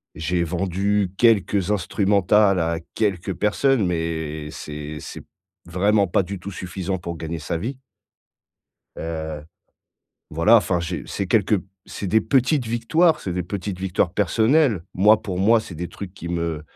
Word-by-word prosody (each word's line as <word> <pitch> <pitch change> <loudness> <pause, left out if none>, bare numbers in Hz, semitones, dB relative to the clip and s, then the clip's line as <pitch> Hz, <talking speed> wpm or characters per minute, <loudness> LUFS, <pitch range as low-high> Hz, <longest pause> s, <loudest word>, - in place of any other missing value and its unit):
J'ai 85 +2 -1
vendu 95 +3 0
quelques 105 -4 +3
instrumentales 100 0 +3
à 85 0 0 0.2
quelques 100 -3 -1
personnes, 110 +5 +2
mais 80 -3 -3
c'est 75 0 -7
c'est - - -9 0.4
vraiment 100 +4 +2
pas 85 - +2
du 100 +2 -6
tout 100 +3 -7
suffisant 95 0 -4
pour 85 -1 -6
gagner 80 +1 -5
sa 80 +2 -3
vie. 120 +10 -4 1.2
Heu, 80 -2 -5 0.9
voilà 85 +9 +5
enfin 90 -3 +2
j'ai 85 +1 -4
c'est 100 - -3
quelques 105 0 +2 0.2
c'est 100 - -6
des 110 +4 +3
petites 135 +2 +2
victoires, 135 +9 +2
c'est 95 - -4
des 90 +1 -2
petites 95 +1 -5
victoires 90 -2 0
personnelles. 110 - +2
Moi 105 +3 +5
pour 90 -3 -4
moi, 110 +5 +5
c'est 95 - -10
des 85 +2 -5
trucs 95 -2 -9
qui 85 - -7
me 85 -3 -2
95 Hz, 150 wpm, -22 LUFS, 85-105 Hz, 1.2 s, voilà